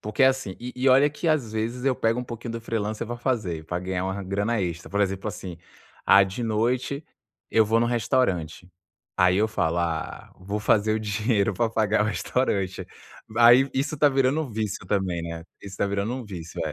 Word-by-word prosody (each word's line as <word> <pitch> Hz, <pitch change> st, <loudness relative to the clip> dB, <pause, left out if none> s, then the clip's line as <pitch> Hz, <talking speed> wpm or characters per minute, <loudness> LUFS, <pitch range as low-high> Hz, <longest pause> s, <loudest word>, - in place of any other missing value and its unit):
porque 105 Hz, +6 st, -1 dB
é -, -, +8 dB
assim 130 Hz, -8 st, 0 dB
e 125 Hz, +1 st, -6 dB
e 130 Hz, +1 st, +2 dB
olha 135 Hz, +3 st, +5 dB
que, 150 Hz, +4 st, -6 dB
às 140 Hz, -9 st, +1 dB
vezes, 115 Hz, +4 st, -3 dB
eu 135 Hz, -2 st, +3 dB
pego 115 Hz, +2 st, 0 dB
um -, -, -6 dB
pouquinho 120 Hz, -1 st, -6 dB
do 115 Hz, -, -5 dB
freelancer 110 Hz, -1 st, -3 dB
para 120 Hz, +2 st, -4 dB
fazer, 110 Hz, -, -2 dB
para 90 Hz, +2 st, -3 dB
ganhar 90 Hz, 0 st, -2 dB
uma 95 Hz, +1 st, -3 dB
grana 100 Hz, +4 st, -1 dB
extra. 85 Hz, -2 st, -4 dB
Por 100 Hz, -, -1 dB
exemplo, 95 Hz, -1 st, -1 dB
assim, 90 Hz, -3 st, -7 dB, 0.5 s
ah, 100 Hz, -, +8 dB
de 95 Hz, +5 st, -3 dB
noite 125 Hz, +6 st, -1 dB, 0.5 s
eu 110 Hz, -, +4 dB
vou 115 Hz, +2 st, +2 dB
no 120 Hz, -, +2 dB
restaurante, 100 Hz, -, 0 dB, 0.5 s
aí 90 Hz, -1 st, +4 dB
eu 110 Hz, +2 st, +2 dB
falo: 85 Hz, -5 st, 0 dB
"Ah, 85 Hz, -2 st, -3 dB
vou 100 Hz, +3 st, -4 dB
fazer 110 Hz, 0 st, +2 dB
o 110 Hz, -, -1 dB
dinheiro 105 Hz, 0 st, 0 dB
para 115 Hz, +5 st, +1 dB
pagar 110 Hz, -2 st, +2 dB
o -, -, 0 dB
restaurante." 100 Hz, -4 st, -1 dB, 0.5 s
Aí, 120 Hz, +3 st, +7 dB
isso 140 Hz, +3 st, -1 dB
está 145 Hz, 0 st, +4 dB
virando 135 Hz, +2 st, +2 dB
um 145 Hz, -, -6 dB
vício 105 Hz, -4 st, -4 dB
também, 95 Hz, -4 st, -1 dB
né, 85 Hz, 0 st, -5 dB, 0.2 s
isso 100 Hz, -, -10 dB
está 100 Hz, -, -1 dB
virando 100 Hz, +3 st, -1 dB
um 130 Hz, -1 st, -6 dB
vício, 85 Hz, -4 st, -7 dB
é. 75 Hz, -, -3 dB
110 Hz, 210 wpm, -25 LUFS, 95-120 Hz, 0.5 s, é